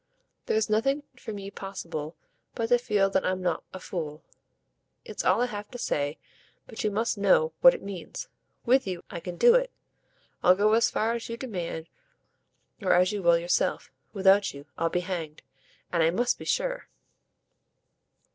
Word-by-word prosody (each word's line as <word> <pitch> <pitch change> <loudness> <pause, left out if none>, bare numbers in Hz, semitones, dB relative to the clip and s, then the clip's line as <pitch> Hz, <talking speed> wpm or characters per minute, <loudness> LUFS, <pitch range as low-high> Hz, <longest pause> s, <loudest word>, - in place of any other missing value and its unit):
"There's 220 0 +1
nothing 270 +7 +1
for 250 - -8
me 200 -1 -7
possible 170 -6 -6 0.4
but 225 -1 -2
to 245 0 +5
feel 205 -4 +1
that 190 - +1
I'm 185 0 0
not 175 -3 -1
a 190 - -8
fool. 155 -5 -5 0.8
It's 215 - -5
all 190 +6 +3
I - - +3
have 210 -3 -6
to 245 - -8
say, 145 -9 -1 0.5
but 225 - -7
you 215 - +2
must 220 +1 -1
know 165 -5 +3
what 260 - +8
it - - -9
means. 200 - -7 0.4
WITH 260 +2 +3
you 180 -2 -4
I 170 - -5
can 175 +1 -6
do 475 - +7
it - - +3 0.7
I'll 180 - +6
go 210 +2 +3
as 230 +1 +4
far 225 +2 0
as 235 0 -5
you 230 - -4
demand 175 -9 -5 0.9
or 190 - +3
as 180 +2 +4
you 205 -1 -3
will 170 -1 +5
yourself. 170 +1 0 0.2
Without 195 -3 +3
you 140 +1 -10
I'll 165 0 0
be 180 - 0
hanged! 170 -4 -5 0.5
And 170 - +2
I 160 - +4
must 245 +8 0
be - - -8
sure." - - -1
195 Hz, 175 wpm, -27 LUFS, 175-225 Hz, 0.9 s, what